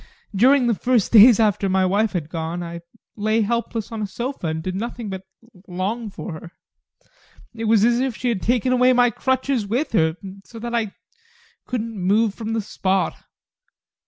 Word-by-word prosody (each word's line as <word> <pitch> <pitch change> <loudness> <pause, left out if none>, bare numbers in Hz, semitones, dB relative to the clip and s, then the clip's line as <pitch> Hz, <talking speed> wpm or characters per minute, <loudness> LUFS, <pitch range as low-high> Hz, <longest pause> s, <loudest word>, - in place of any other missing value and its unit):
During 255 +5 +4
the 235 - +2
first 240 0 +1
days 230 0 +8
after 205 -3 +2
my 190 0 +2
wife 205 +4 +1
had 170 -5 -3
gone, 165 +1 -4
I 170 0 -7 0.3
lay 215 +1 +1
helpless 230 0 -2
on 225 -1 -5
a 210 - -2
sofa 240 -1 -4
and 160 0 -3
did 185 - -3
nothing 230 +2 -5
but 190 0 -7 0.4
long 200 +5 -3
for 195 -2 -7
her. 160 +2 -10 1.0
It 225 -1 -5
was 220 -1 +4
as 240 0 +3
if 260 -3 -1
she 250 - -1
had 215 -6 -1
taken 250 +2 +1
away 255 0 +4
my 245 -1 +4
crutches 260 -4 -1
with 245 +9 -1
her, 160 -5 +1 0.3
so 230 - -13
that 235 +1 -5
I 225 -4 -1 0.7
couldn't 230 -2 -3
move 205 +3 +2
from 225 +1 -5
the 225 - 0
spot. 190 -1 -1
220 Hz, 180 wpm, -22 LUFS, 190-240 Hz, 1.0 s, days